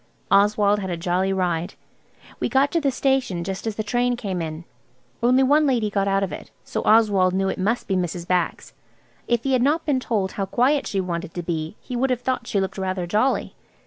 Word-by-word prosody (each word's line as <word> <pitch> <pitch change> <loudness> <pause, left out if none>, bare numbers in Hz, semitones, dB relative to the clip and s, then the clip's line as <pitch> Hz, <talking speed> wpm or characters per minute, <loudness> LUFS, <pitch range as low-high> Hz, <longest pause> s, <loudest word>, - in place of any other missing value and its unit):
Oswald 205 +1 +4
had 190 -2 -4
a 175 - -2
jolly 180 +3 0
ride. 175 -3 -1 0.6
We - - -1
got 275 +1 +3
to 335 - +1
the 280 - +2
station 260 -9 0
just 195 +4 -5
as 220 - -2
the 215 - -2
train 245 +3 +1
came 195 -7 -3
in. 160 +1 -5 0.6
Only 250 +3 +4
one 295 +3 +4
lady 230 -6 +1
got 200 -1 0
out 195 0 +2
of 195 - -2
it, - - -8
so - - -3
Oswald 205 -4 +4
knew 195 0 +1
it - - -4
must 220 +6 0
be 195 - 0
Mrs. 175 -1 -2
Bax. 180 -2 -1 0.5
If 235 -1 +1
he 270 - 0
had 255 - +3
not 300 +6 +1
been 280 -4 +1
told 205 -7 -1
how 195 -1 -3
quiet 270 +8 +2
she 195 - -1
wanted 170 -2 -4
to 175 - -3
be 160 0 -3
he 250 - -6
would 260 +2 +1
have 250 -1 0
thought 250 -2 -2
she 200 - 0
looked 195 +1 -3
rather 185 -1 -2
jolly. 215 +9 0
200 Hz, 220 wpm, -23 LUFS, 185-245 Hz, 0.6 s, Oswald